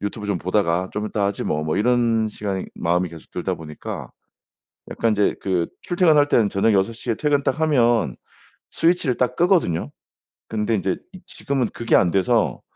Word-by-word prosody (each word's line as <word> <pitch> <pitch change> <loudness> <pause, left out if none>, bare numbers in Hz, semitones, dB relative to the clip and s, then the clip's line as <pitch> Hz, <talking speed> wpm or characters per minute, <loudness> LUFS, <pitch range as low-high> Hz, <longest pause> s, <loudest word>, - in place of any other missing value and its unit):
'유튜브 105 +1 -4
좀 100 -2 0
보다가 95 -1 0
좀 105 +1 -3
있다 105 -1 -1
하지 100 - -3
뭐.' 75 - -1
뭐 80 - -1
이런 115 0 +2
시간이 100 -3 -4
마음이 90 +2 0
계속 80 -1 -13
들다 - - -2
보니까 75 -2 -8 0.8
약간 115 - 0
인제 105 -1 +2
그 90 -3 0 0.2
출퇴근할 160 -5 +3
때는 110 -7 +3
저녁 100 +3 +2
6 100 +3 +2
시에 115 +1 -3
퇴근 145 +2 +1
딱 140 +3 -1
하면 120 - +2 0.5
스위치를 165 -7 +1
딱 125 0 0
끄거든요. 165 - +2 0.6
근데 110 +1 -1
인제 95 -2 -1 0.2
이 185 - -12
지금은 135 -4 -2
그게 115 - +1
안 90 -2 +4
돼서 110 +5 +1
110 Hz, 335 characters per minute, -22 LUFS, 95-125 Hz, 0.8 s, 안